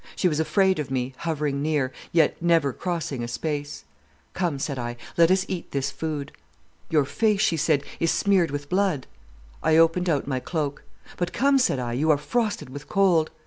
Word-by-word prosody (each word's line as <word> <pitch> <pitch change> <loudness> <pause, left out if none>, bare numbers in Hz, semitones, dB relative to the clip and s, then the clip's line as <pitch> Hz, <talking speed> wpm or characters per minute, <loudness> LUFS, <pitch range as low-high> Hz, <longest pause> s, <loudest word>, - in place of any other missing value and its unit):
She 185 - +2
was 155 -3 0
afraid 190 +2 +2
of 145 -2 -3
me, 130 0 -2
hovering 150 -4 -2
near, 145 -4 0 0.2
yet 165 -2 +2
never 165 -5 +3
crossing 165 -8 -3
a - - -3
space. 145 - -4 0.5
"'Come,' 175 -6 -1
said 135 -1 -3
I, 120 0 -4 0.2
'let 170 -1 +5
us 185 +1 +3
eat 180 -3 -5
this 140 0 -2
food.' 150 -3 -4 0.6
"'Your 150 -3 +3
face,' 210 +6 +1
she 195 -6 +3
said, 155 -2 +2 0.2
'is 165 - +2
smeared 190 -3 +2
with 145 0 -5
blood.' 185 -5 0 0.6
"I 160 0 +3
opened 165 +2 +3
out 145 -4 +1
my 130 -2 -1
cloak. 145 0 -3 0.3
"'But 175 0 -2
come,' 275 +1 +3
said 250 - +2
I, 120 -2 -3
'you 150 +6 0
are 150 - +5
frosted 210 - -2
with 145 +1 -9
cold. 180 -6 +3
155 Hz, 185 wpm, -25 LUFS, 140-180 Hz, 0.6 s, let